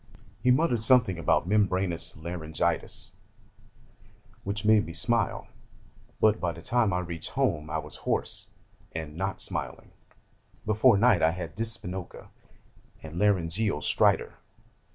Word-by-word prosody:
He 125 - +2
muttered 125 -3 +2
something 115 -7 +5
about 85 +1 +1
membranous 95 -5 0
laryngitis 85 0 -2 1.3
which 100 +1 -4
made 110 -3 +4
me 85 - -7
smile, 115 +8 0 0.7
but 110 0 +3
by 85 -2 -2
the 85 - -11
time 120 -1 +1
I 90 - 0
reached 85 -2 -3
home 75 +1 -1
I 80 - -2
was 75 -1 -6
hoarse, - - -3 0.4
and 80 -2 -6
not 95 +3 -3
smiling: - - -2 0.7
before 110 +1 +4
night 105 -4 +4
I 80 - +4
had 85 -1 -6
dyspnoca 95 -5 -4 0.7
and 80 +2 -7
laryngeal 100 -3 +1
stridor. - - +2
90 Hz, 125 wpm, -27 LUFS, 80-110 Hz, 1.3 s, something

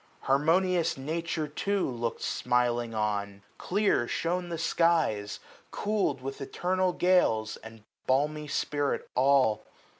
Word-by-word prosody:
Harmonious 165 +5 +2
Nature 160 +2 -3
too 195 +6 -1
lookM 120 -2 -3
smiling 120 -2 0
on; 100 -2 -2 0.2
Clear 195 - +1
shone 175 +5 -2
the 170 - -3
skies, 160 -12 +1 0.3
cool'd 200 -10 -1
with 135 +2 -6
eternal 185 +6 0
gales. 175 -13 +2
And 110 -1 -13 0.2
balmy 150 +3 +1
spirit 145 0 -1
all. 130 -4 +3
145 Hz, 110 wpm, -28 LUFS, 120-170 Hz, 0.3 s, all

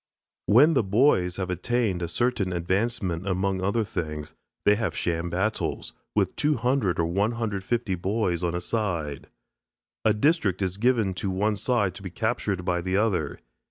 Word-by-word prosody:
When 145 +10 +6
the 135 - +4
boys 95 -4 +3
have 95 -1 -3
attained 100 0 0
a 85 - -1
certain 110 0 0
advancement 95 0 -1
among 95 0 0
other 100 +4 +1
things 75 -6 -5 0.3
they 105 - +6
have 105 0 -2
sham 85 0 -1
battles, 95 +6 -2 0.2
with - - +1
200 125 - +1
or 85 - +3
150 105 +3 -1
boys 95 -2 -1
on 85 0 0
a 90 - -2
side. 85 - -2 0.8
A 110 -1 +3
district 105 - +2
is 95 0 -2
given 115 -4 +2
to 95 +2 -3
one 105 +3 +1
side 105 -3 +1
to 100 - -11
be 95 - -6
captured 100 -2 -2
by 90 -1 0
the 95 +2 0
other. 95 -9 0
100 Hz, 160 wpm, -26 LUFS, 90-115 Hz, 0.8 s, When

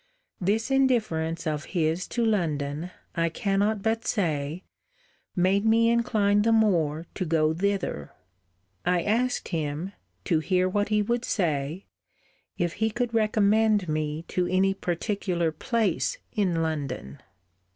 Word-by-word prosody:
This 215 +7 0
indifference 205 -12 +1
of 155 -1 -2
his 165 +2 0
to 235 -1 -1
London, 160 -6 -1 0.3
I 165 0 +1
cannot 200 +4 0
but 225 0 0
say, 160 -4 -1 0.7
made 190 +3 +2
me 230 +1 +4
incline 210 -3 +2
the 230 +2 +2
more 170 -8 +2
to - - -3
go 155 -2 +2
thither. 190 - -2 0.7
I 175 -1 +1
asked 245 +4 0
him 160 +3 -3 0.3
(to 160 - +2
hear 185 +3 +1
what 205 +2 0
he 210 -1 +2
would 235 +3 -1
say) 160 - -1 0.7
if 175 -1 0
he 220 - +3
could 235 +1 -2
recommend 215 -2 +3
me 155 0 -2
to 180 -1 0
any 190 +2 +2
particular 175 -2 -1
place 230 - 0
in 180 -7 +1
London? 135 - -4
185 Hz, 130 wpm, -26 LUFS, 160-215 Hz, 0.7 s, me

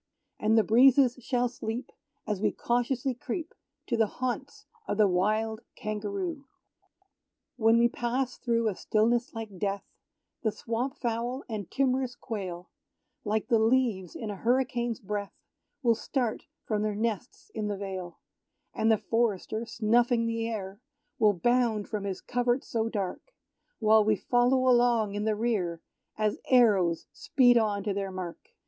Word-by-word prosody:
And 220 +1 +3
the 220 - +6
breezes 255 +2 +5
shall 245 0 +1
sleep, 240 +1 -5 0.3
As 210 -3 -2
we - - +2
cautiously 245 +2 0
creep 315 +7 -5 0.3
To 235 - -1
the 225 -1 +3
haunts 255 +4 -4 0.2
of - - -1
the 210 -2 +5
wild 215 +4 0
Kangaroo. 235 - -4 1.1
When 225 -1 +4
we 235 0 +5
pass 245 +2 -2
through 230 -2 +1
a 210 - +1
stillness 235 +5 +1
like 215 -5 -7
death 200 +1 -1 0.6
The 220 - +1
swamp 235 +5 -3
fowl 240 +2 -2
and 210 -6 -5
timorous 260 -2 0
quail, 185 -8 -6 0.5
Like 215 0 -1
the 230 -3 +4
leaves 225 -6 +1
in 220 -3 -4
a - - -5
hurricane's 240 0 0
breath, 205 -2 -4 0.5
Will 235 -2 +5
start 240 0 -2 0.2
from 210 -1 -1
their 210 -1 -1
nests 225 +2 -3
in 215 -1 -2
the 205 -1 -2
vale; 190 -3 -6 0.6
And 225 - +2
the 220 - +4
forester,* 225 0 -1
snuffing 235 +1 +2
the 230 0 -1
air, 200 -3 -5 0.4
Will 210 -2 +5
bound 230 +1 +1
from 210 -2 -4
his 190 -2 -4
covert 245 +1 0
so 225 -1 -1
dark, 205 - -4 0.4
While 220 -1 +5
we 215 0 +3
follow 250 +5 +2
along 240 -4 +3
in 205 +1 -2
the 215 -1 +1
rear, 205 -7 -1 0.4
As 215 -1 0
arrows 200 -10 +4
speed 245 - +4
on 210 -3 +2
to 205 -1 -1
their 195 0 -2
mark! 185 -2 -6
225 Hz, 150 wpm, -28 LUFS, 210-245 Hz, 1.1 s, the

